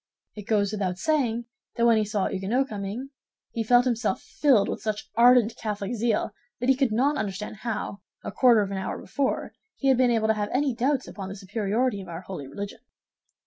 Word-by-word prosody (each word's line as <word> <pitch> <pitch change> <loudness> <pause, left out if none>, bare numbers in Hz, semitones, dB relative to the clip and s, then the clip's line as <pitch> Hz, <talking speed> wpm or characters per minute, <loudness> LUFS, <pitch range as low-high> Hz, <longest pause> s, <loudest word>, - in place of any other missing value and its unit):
It 210 -2 -10
goes 205 -2 +2
without 190 -4 -2
saying 240 -2 0 0.3
that 235 - +2
when 230 -1 +5
he 215 - +2
saw 205 -2 -1
a - - -2
Huguenot 215 +8 0
coming, 215 +6 -5 0.4
he 230 - -2
felt 245 +3 +5
himself 230 -5 0
filled 240 -4 +2
with - - -4
such 215 -1 -3
ardent 240 -1 +5
Catholic 210 0 -3
zeal 230 -2 0 0.3
that 245 +2 0
he 265 - +6
could 265 -3 +1
not 270 +7 +2
understand 210 +1 -4
how, 215 -3 -4 0.2
a - - -4
quarter 235 +1 +5
of 200 - -5
an 195 - -2
hour 190 - -3
before, 270 +8 -2 0.2
he 275 - 0
had 260 - +5
been 255 -1 +4
able 225 -2 +2
to - - +5
have 210 -1 -2
any 270 0 +1
doubts 260 +3 0
upon 195 -2 -7
the 195 - -6
superiority 210 +3 -1
of 185 - -10
our 170 0 -6
holy 180 -7 -7
religion. 200 +10 -7
220 Hz, 210 wpm, -26 LUFS, 200-250 Hz, 0.4 s, he